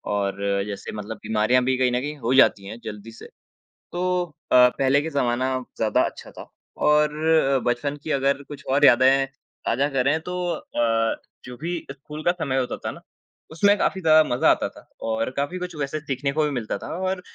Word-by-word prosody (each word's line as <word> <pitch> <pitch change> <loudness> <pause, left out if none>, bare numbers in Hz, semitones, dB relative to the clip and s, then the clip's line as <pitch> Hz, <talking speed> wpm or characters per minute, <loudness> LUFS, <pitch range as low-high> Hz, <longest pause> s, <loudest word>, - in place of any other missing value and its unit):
और 100 -1 -1 0.3
जैसे 100 -1 -6
मतलब 110 +1 -7
बीमारियाँ 110 +4 +2
भी 130 +1 +1
कहीं 125 -1 +2
न 125 - +1
कहीं 150 +2 -4
हो 120 -1 -2
ही 130 - +4
जाती 100 -6 +5
हैं 110 +3 -8
जल्दी 105 +2 -8
से। - - -11 0.6
तो 175 +1 -2 0.5
अ, 125 0 +7
पहले 135 +1 +3
के 160 - -4
ज़माना 130 +1 0 0.2
ज़्यादा 110 -1 +2
अच्छा - - -12
था - - -11 0.3
और 150 0 +3 0.4
अ, - - 0
बचपन 140 +4 -2
की 155 - -4
अगर 140 +1 +1
कुछ 145 0 -11
और 145 +1 +5
यादें 135 +2 +5 0.4
ताजा 140 +2 +1
करें 135 +5 +2
तो 180 - -3 0.2
अ, 115 -1 0 0.3
जो 125 -1 -9
भी 170 +3 -3
स्कूल 150 +3 -9
का 175 - +4
समय 150 -7 -2
होता 125 -1 -1
था - - -5
ना, - - -12 0.5
उसमें 200 +6 +3
काफ़ी 190 -2 0
ज़्यादा 155 -1 +6
मज़ा 120 - +3
आता - - +1
था - - -14 0.3
और 115 +2 -1
काफ़ी 145 +6 -1
कुछ 180 -2 -6
वैसे 145 +1 -3
सीखने 140 -1 -2
को 155 +1 +1
भी 150 - +1
मिलता 110 -3 -3
था - - -6 0.2
और 185 -1 -2
135 Hz, 200 wpm, -23 LUFS, 120-150 Hz, 0.6 s, अ